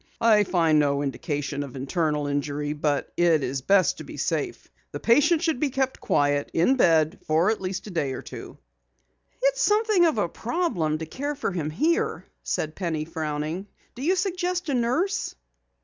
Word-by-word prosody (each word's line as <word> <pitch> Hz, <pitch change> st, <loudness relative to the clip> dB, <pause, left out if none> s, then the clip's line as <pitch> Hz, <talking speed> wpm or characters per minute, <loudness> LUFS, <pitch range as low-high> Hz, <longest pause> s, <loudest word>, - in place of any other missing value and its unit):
"I 220 Hz, -3 st, +5 dB
find 165 Hz, -4 st, +3 dB
no 140 Hz, -1 st, +1 dB
indication 145 Hz, +1 st, -3 dB
of 140 Hz, -3 st, -7 dB
internal 150 Hz, +2 st, -1 dB
injury, 145 Hz, +1 st, -2 dB
but 145 Hz, -2 st, -1 dB
it 165 Hz, -4 st, +3 dB
is 135 Hz, +1 st, -2 dB
best 190 Hz, +5 st, +3 dB
to -, -, -6 dB
be -, -, -10 dB
safe. -, -, -2 dB, 0.3 s
The -, -, -4 dB
patient 295 Hz, +7 st, +4 dB
should 320 Hz, -6 st, 0 dB
be 295 Hz, -, +1 dB
kept 265 Hz, 0 st, -1 dB
quiet, 145 Hz, 0 st, +1 dB
in 175 Hz, +11 st, +4 dB
bed, 160 Hz, -9 st, +3 dB
for 165 Hz, +6 st, +3 dB
at 220 Hz, -, -3 dB
least 185 Hz, 0 st, -4 dB
a 210 Hz, -, -8 dB
day 150 Hz, -6 st, -1 dB
or -, -, -6 dB
two." -, -, -9 dB, 0.9 s
"It's -, -, +2 dB
something 420 Hz, -3 st, +3 dB
of 310 Hz, -, 0 dB
a 205 Hz, -, +1 dB
problem 185 Hz, -, -1 dB
to 160 Hz, -, -5 dB
care 285 Hz, -, -4 dB
for 280 Hz, -, -2 dB
him 165 Hz, -5 st, -2 dB
here," 310 Hz, -, 0 dB, 0.2 s
said 155 Hz, 0 st, -2 dB
Penny 160 Hz, -5 st, -3 dB
frowning. 155 Hz, +3 st, -4 dB, 0.3 s
"Do 245 Hz, -, -10 dB
you 350 Hz, +7 st, +2 dB
suggest 365 Hz, -2 st, -1 dB
a -, -, +1 dB
nurse?" 255 Hz, +11 st, 0 dB
175 Hz, 180 wpm, -25 LUFS, -, 0.9 s, I